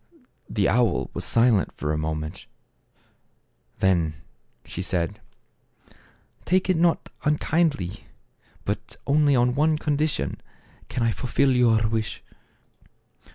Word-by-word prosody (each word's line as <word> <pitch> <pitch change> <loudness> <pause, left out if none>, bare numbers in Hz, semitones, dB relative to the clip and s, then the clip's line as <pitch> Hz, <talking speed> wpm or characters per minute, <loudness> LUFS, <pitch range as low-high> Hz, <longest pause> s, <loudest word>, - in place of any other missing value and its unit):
The 100 -3 +1
owl 120 -1 +1
was - - -2
silent 115 -6 +3
for 75 0 -2
a - - 0
moment. 75 0 -4 1.3
Then 85 -5 +2 0.5
she 90 - -5
said, 95 +3 -2 0.7
" - - -30
Take 185 +1 +2
it - - +2
not 170 0 +2
unkindly; 150 - 0 0.6
but - - -4
only 145 0 +3
on 125 0 +3
one 155 +3 +2
condition 150 - -1 0.5
can 125 - -1
I 115 - +2
fulfill 130 +3 +1
your 115 -3 +4
wish." 110 -1 -3
120 Hz, 110 wpm, -25 LUFS, 95-150 Hz, 1.3 s, your